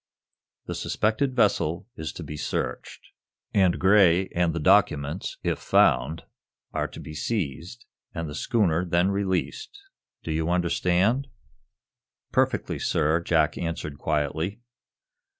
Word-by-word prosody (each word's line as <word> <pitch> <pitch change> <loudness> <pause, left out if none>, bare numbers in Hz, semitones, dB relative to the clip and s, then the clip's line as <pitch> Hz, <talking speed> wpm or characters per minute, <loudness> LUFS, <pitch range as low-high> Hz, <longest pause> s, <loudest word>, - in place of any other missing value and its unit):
The - - -4
suspected 120 +5 0
vessel 100 -7 +1
is 80 0 -5
to - - -7
be 75 - -7
searched, - - -4 0.4
and 95 -3 +3
Gray 95 -2 +4
and 85 -1 +1
the 85 - -3
documents, 85 -3 +2
if - - -1
found, 80 +6 +2 0.5
are - - -1
to - - -11
be 75 - -9
seized, 90 - -4 0.3
and 80 -1 -4
the 75 - -6
schooner 90 -4 +1
then 90 +2 +2
released. 100 - -2 0.5
Do 80 - -4
you 80 +1 -1
understand?" 90 +8 +1 1.0
"Perfectly, - - 0
sir." 80 +3 +1
Jack 80 -3 +1
answered 80 -4 -4
quietly. 80 +7 -1
85 Hz, 120 wpm, -26 LUFS, 80-100 Hz, 1.0 s, Gray